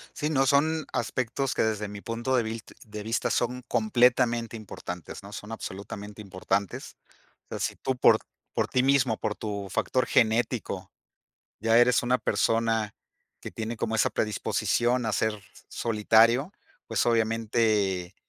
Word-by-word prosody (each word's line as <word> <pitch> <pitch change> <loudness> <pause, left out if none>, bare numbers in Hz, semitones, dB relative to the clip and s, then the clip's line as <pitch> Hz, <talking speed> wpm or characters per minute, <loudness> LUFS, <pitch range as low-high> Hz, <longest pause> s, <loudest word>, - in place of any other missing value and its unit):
Sí, 150 - -1
no 135 -3 +2
son 155 +3 +2
aspectos 125 +2 -1
que, - - +2
desde 105 -1 -1
mi 100 0 -8
punto 120 +4 -2
de 120 - +3
vilt 110 0 -6 0.2
de 105 0 -7
vista, 115 +2 -1
son 125 +1 -1
completamente 120 0 +2
importantes, 90 -4 -8
¿no?, 100 +1 -11
son 105 +2 -8
absolutamente 105 0 -7
importantes. 100 0 -3 0.5
O - - -48
sea, - - -4
si - - -2
tú 130 - -2
por - - +6 0.4
por - - 0
ti 125 - +2
mismo, 130 -5 +3
por 105 - -2
tu 100 -2 -5
factor 125 +6 0
genético, 115 0 +1 0.7
ya 115 +2 +4
eres 120 0 +5
una 125 +1 +2
persona 115 -2 +1 0.5
que - - -7
tiene 115 +1 -4
como 115 0 -1
esa - - +3
predisposición 120 +3 0
a 110 - 0
ser 105 0 0 0.3
solitario, 115 - +3 0.3
pues, - - 0
obviamente, 110 -5 +1
115 Hz, 150 wpm, -27 LUFS, 105-120 Hz, 0.7 s, por